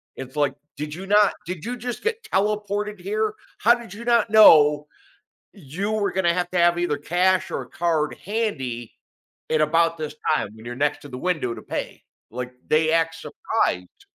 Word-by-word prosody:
It's 130 +2 -9
like, 145 -2 +1 0.2
"Did 150 +1 -5
you 190 +2 -7
not 205 +1 +4
did 175 -2 -6
you 245 +1 -4
just 245 +1 -5
get 455 0 -2
teleported 210 - -1
here? 215 +3 -1 0.2
How 235 +2 +5
did 235 -5 -10
you 230 +3 -9
not 235 -2 +3
know 150 -8 +7 0.7
you 195 +3 -4
were 210 -2 0
gonna 175 -3 +1
have 180 0 -1
to 180 - -1
have 175 0 +4
either 160 -5 0
cash 180 +5 +1
or - - -2
a - - -17
card 160 -3 0
handy 135 - -3 0.6
in 155 - +2
about 165 +2 +2
this 150 -1 -5 0.2
time 115 - -1
when 110 +1 -14
you're 120 0 -6
next 145 +2 0
to 145 - -11
the 125 - -7
window 155 -8 -1
to - - -9
pay?" - - -5 0.3
Like, 125 +1 -5
they 155 +1 +3
act 165 0 +1
surprised. 90 - -3
175 Hz, 185 wpm, -23 LUFS, 150-210 Hz, 0.7 s, know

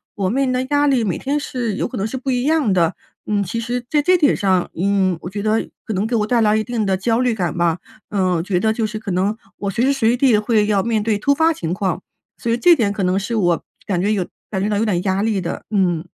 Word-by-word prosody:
我 190 -2 -1
面 270 +2 +1
临 255 - 0
的 255 +1 0
压 290 0 +3
力 260 -4 +2
每 190 - -1
天 285 +2 -1
是 240 -7 -3
有 - - -1
可 - - -8
能 195 - -1
是 260 +4 -5
不 265 +1 -3
一 245 - 0
样 295 -9 +2
的。 170 -1 +2 0.3
嗯， 205 -1 +1
其 230 +6 -3
实 240 +1 -3
在 295 +1 +2
这 365 +4 +4
点 295 -4 +3
上， 190 -3 +1
嗯， 190 0 +1
我 180 - -6
觉 200 +2 -5
得 220 +1 0 0.2
可 220 - -3
能 195 +3 0
给 235 - -1
我 210 - +1
带 235 +1 +2
来 215 -1 +3
一 215 - 0
定 230 -2 -2
的 190 - +1
焦 225 +4 0
虑 250 -2 +1
感 175 -6 -2
吧， 170 0 +1 0.3
嗯， 190 -3 +1
我 - - -1
觉 180 0 0
得 220 +1 +1
就 220 -1 -1
是 215 - -5
可 215 -3 -5
能 195 +5 0 0.2
我 200 - -3
随 225 +6 0
时 275 - +3
随 240 -2 +2
地 250 -5 +4
会 210 -1 +2
要 205 -2 +2
面 225 -1 0
对 215 -2 0
突 280 +7 +3
发 320 +2 +3
情 165 - -4
况， 185 -1 -1 0.4
所 230 - -2
以 235 - +2
这 345 +8 +6
点 220 -8 +1
可 205 -1 -3
能 185 +1 +2
是 230 +4 -3
我 175 -6 +1 0.2
感 180 -3 -1
觉 205 +2 +1
有 195 -4 0 0.2
感 190 -3 -2
觉 205 - +1
到 205 - 0
有 225 - +1
点 180 -5 0
压 195 0 0
力 215 -3 0
的， 170 - -4
嗯。 180 -6 +1
215 Hz, 305 characters per minute, -20 LUFS, 190-240 Hz, 0.4 s, 这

